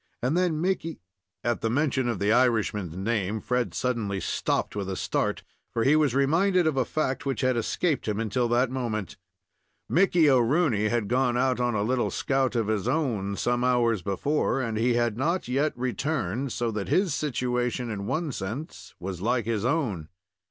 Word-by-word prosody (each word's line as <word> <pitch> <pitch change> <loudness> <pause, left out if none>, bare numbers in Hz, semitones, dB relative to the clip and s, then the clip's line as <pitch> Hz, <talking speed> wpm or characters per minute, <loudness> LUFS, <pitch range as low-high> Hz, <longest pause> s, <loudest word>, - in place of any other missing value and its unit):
And 130 +6 0
then 175 -4 +1
Mickey 170 -2 -1 0.2
" - - -61 0.2
At 120 0 0
the 115 - 0
mention 130 0 +1
of 115 -3 -1
the 100 +3 +1
Irishman's 110 -7 +1
name, 105 0 -1
Fred 125 +2 -1
suddenly 110 -6 -1
stopped - - -1
with 100 -2 -3
a 95 - -2
start, - - -1 0.3
for 115 - 0
he 140 +5 +5
was 150 -5 +2
reminded 175 +7 +3
of 155 -3 +1
a 130 -2 +1
fact 135 -2 -1
which 135 -1 -2
had 130 -1 +2
escaped 135 +6 -1
him 105 0 -1
until 115 +2 0
that 120 +2 +2
moment. 115 -7 -3 0.7
Mickey 175 -3 +4
O'Rooney 125 -3 +3
had 115 -2 0
gone 125 +1 +1
out 130 0 +1
on 120 -2 +1
a 100 - +1
little 125 +2 +1
scout 135 -2 0
of 115 -2 +1
his 105 -2 -1
own, 110 -11 0
some 120 +3 0
hours 120 -4 +2
before, 135 +10 0
and 115 -4 -2
he 120 +2 +2
had 120 -2 +1
not 170 +5 0
yet 140 +5 +1
returned, 130 - -2
so 120 -1 -1
that 105 -2 -3
his 185 -5 +2
situation, 125 -4 -1
in 100 -1 -4
one 155 -2 -1
sense, 120 +8 -6
was 90 -1 -5
like 120 +1 +1
his 110 -2 -1
own. 120 - -1
120 Hz, 185 wpm, -26 LUFS, 110-140 Hz, 0.7 s, he